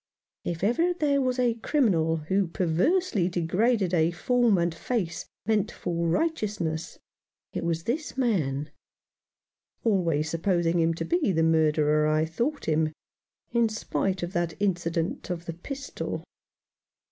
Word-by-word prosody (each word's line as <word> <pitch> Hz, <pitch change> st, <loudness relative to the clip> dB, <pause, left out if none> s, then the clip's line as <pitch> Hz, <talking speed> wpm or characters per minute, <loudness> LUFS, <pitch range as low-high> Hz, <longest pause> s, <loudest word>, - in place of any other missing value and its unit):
If 170 Hz, 0 st, -4 dB
ever 330 Hz, -, +2 dB
there 285 Hz, -4 st, +2 dB
was 255 Hz, -1 st, 0 dB
a 245 Hz, -2 st, +3 dB
criminal 200 Hz, -, +1 dB
who 190 Hz, +5 st, 0 dB
perversely 185 Hz, -, +1 dB
degraded 185 Hz, +3 st, +1 dB
a 165 Hz, -1 st, +4 dB
form 235 Hz, +4 st, +2 dB
and 170 Hz, -1 st, +1 dB
face 175 Hz, -1 st, -3 dB, 0.2 s
meant 215 Hz, 0 st, +1 dB
for 170 Hz, -1 st, -2 dB
righteousness, 195 Hz, -, -1 dB, 0.6 s
it -, -, -3 dB
was 165 Hz, -1 st, -1 dB
this 285 Hz, -, -3 dB
man; 150 Hz, -, 0 dB, 1.1 s
always 170 Hz, -8 st, +2 dB
supposing 170 Hz, +1 st, +1 dB
him 165 Hz, 0 st, +2 dB
to -, -, -3 dB
be 340 Hz, -, +1 dB
the 165 Hz, -2 st, +2 dB
murderer 155 Hz, -1 st, +3 dB
I 155 Hz, +1 st, +2 dB
thought 235 Hz, -, -2 dB
him, 155 Hz, 0 st, +1 dB, 0.6 s
in 235 Hz, -1 st, +3 dB
spite 195 Hz, -3 st, -2 dB
of 175 Hz, +2 st, -4 dB
that 175 Hz, -2 st, -1 dB
incident 170 Hz, -4 st, -1 dB
of 175 Hz, -1 st, -4 dB
the 165 Hz, -, -4 dB
pistol. 275 Hz, -, -5 dB
175 Hz, 135 wpm, -27 LUFS, 165-235 Hz, 1.1 s, a